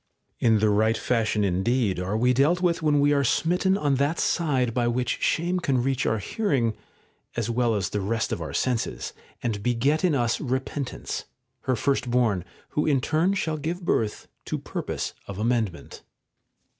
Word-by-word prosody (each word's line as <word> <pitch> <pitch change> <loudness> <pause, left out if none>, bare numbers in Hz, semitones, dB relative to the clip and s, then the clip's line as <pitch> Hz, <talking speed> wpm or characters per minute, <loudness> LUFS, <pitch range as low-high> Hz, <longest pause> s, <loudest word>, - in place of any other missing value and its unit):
In 115 -2 +4
the 105 0 +3
right 110 +2 +3
fashion 110 -3 +1
indeed 100 +2 +1
are 95 +4 -1
we 125 +2 +3
dealt 145 +8 +3
with 175 -2 +1
when 150 -2 +3
we 145 +1 +4
are 140 -1 +2
smitten 180 +8 +2
on 145 -6 +1
that 145 +5 +1
side 130 -8 +1
by 120 -1 +1
which 120 0 -1
shame 175 +3 +1
can 130 -7 +1
reach 135 -1 0
our 110 - +2
hearing 120 - 0 0.6
as 120 -1 -1
well 120 -1 +1
as 95 -2 -1
the 105 - -2
rest 110 +3 -1
of - - -2
our 80 -3 -4
senses, 120 - -1 0.3
and 110 -4 -1
beget 125 - +1
in 175 -5 +3
us 120 -3 +1
repentance, 130 0 -3 0.4
her 130 - +2
first 130 +1 0
born, 115 -7 +2 0.3
who 150 - 0
in 140 -3 +3
turn 160 +8 +1
shall 160 -5 -1
give 170 +4 -4
birth 110 -8 0 0.2
to - - -2
purpose - - -4
of 100 - -6
amendment. 110 -5 -1
125 Hz, 175 wpm, -25 LUFS, 110-145 Hz, 0.6 s, In